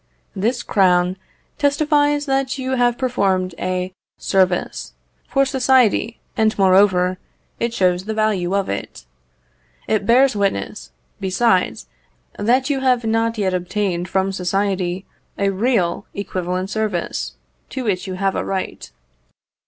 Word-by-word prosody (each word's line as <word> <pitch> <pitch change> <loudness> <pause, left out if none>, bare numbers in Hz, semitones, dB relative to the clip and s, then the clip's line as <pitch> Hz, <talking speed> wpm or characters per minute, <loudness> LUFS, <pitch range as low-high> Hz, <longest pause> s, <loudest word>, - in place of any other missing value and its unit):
This 230 +6 0
crown 180 -2 +3 0.4
testifies 290 0 +2
that 270 -1 0
you 260 -1 -3
have 245 -2 +2
performed 195 -8 0
a 185 0 -2 0.2
service 185 -2 0 0.3
for 275 0 +2
society, 255 -4 +2 0.2
and, 220 -1 +2
moreover, 185 -1 +4 0.4
it 235 - 0
shows 185 -4 +1
the 220 - -2
value 200 -4 +1
of 200 -1 0
it. 100 -10 -5 0.8
It 210 -2 0
bears 255 +1 +5
witness, 100 - -2 0.3
besides, 190 0 +1 0.5
that 250 +5 +2
you 285 -2 0
have 255 -2 +2
not 225 +1 +1
yet 190 -3 0
obtained 180 -1 -2
from 190 0 +1
society 190 -1 -1 0.3
a 200 0 +1
real 195 -4 0
equivalent 185 -1 -3
service, 195 - -2 0.3
to 260 - -4
which 195 -4 -1
you 185 - -4
have 195 0 0
a - - -1
right. 190 - -4
200 Hz, 125 wpm, -20 LUFS, 185-240 Hz, 0.8 s, bears